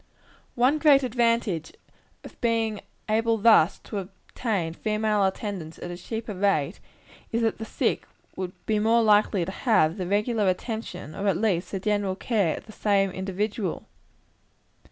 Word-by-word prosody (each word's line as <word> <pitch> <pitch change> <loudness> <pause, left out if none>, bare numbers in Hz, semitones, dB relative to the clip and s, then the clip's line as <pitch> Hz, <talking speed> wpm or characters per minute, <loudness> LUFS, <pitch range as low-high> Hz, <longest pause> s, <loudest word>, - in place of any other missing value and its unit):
One 255 +5 +3
great 285 -3 +6
advantage 230 -8 0 0.5
of - - -13
being 225 -3 0 0.3
able 225 +1 +2
thus 210 -5 +5
to 210 - -4
obtain 190 -2 -4
female 215 +1 0
attendants 190 -4 -4
at 175 - -7
a - - -5
cheaper 220 +4 -5
rate, 185 -4 0 0.5
is 230 0 0
that 225 - 0
the 220 - -4
sick - - -1 0.3
would 185 -1 -4
be 215 -1 +1
more 225 +2 +3
likely 210 -4 +3
to 190 - -5
have 195 -7 +2
the 185 -2 -3
regular 210 +2 +1
attention, 185 - -3
or 200 +1 -3
at 190 -4 +2
least, 185 -4 0
the 195 - -2
general 205 -1 0
care, 200 -6 0
of - - -10
the 215 - -12
same 200 -2 +1
individual. 195 +1 -3
210 Hz, 155 wpm, -26 LUFS, 185-225 Hz, 0.5 s, great